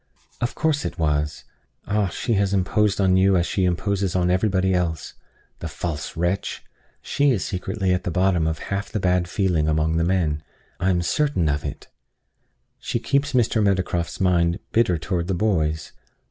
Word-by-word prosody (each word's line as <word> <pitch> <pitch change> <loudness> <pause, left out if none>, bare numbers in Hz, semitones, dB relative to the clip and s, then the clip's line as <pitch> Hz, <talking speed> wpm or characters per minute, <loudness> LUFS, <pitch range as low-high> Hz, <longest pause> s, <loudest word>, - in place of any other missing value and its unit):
"Of 120 - -1
course 155 -2 +1
it 85 - -4
was. 75 -2 -1 0.4
Ah! 105 0 +1
she 115 +6 -2
has 100 -1 +1
imposed 100 +2 +1
on 95 -1 +4
you 95 0 +4
as 85 - +2
she 95 0 0
imposes 95 +1 0
on 90 -1 +2
everybody 95 0 +2
else. 85 -3 -1 0.5
The - - -4
false 80 -2 -5
wretch! 90 +4 -1 0.4
She 145 0 +2
is 115 -8 +1
secretly 95 +1 -1
at 90 - -1
the - - -2
bottom 90 -2 +2
of 80 0 -1 0.2
half 100 0 -2
the 105 - -2
bad 90 -1 +1
feeling 90 -5 +1
among 80 +1 +1
the 85 - +2
men. 85 -4 +1 0.4
I 95 - +1
am 90 -2 +1
certain 140 - +1
of 75 0 -1
it - - -6 0.9
she - - -2
keeps 140 +4 0
Mr. 115 -2 +2
Meadowcroft's 95 -4 0
mind 85 -2 +2
bitter 110 -7 +3
toward 85 +1 -2
the 95 - 0
boys. 80 -6 0
90 Hz, 175 wpm, -23 LUFS, 85-100 Hz, 0.9 s, on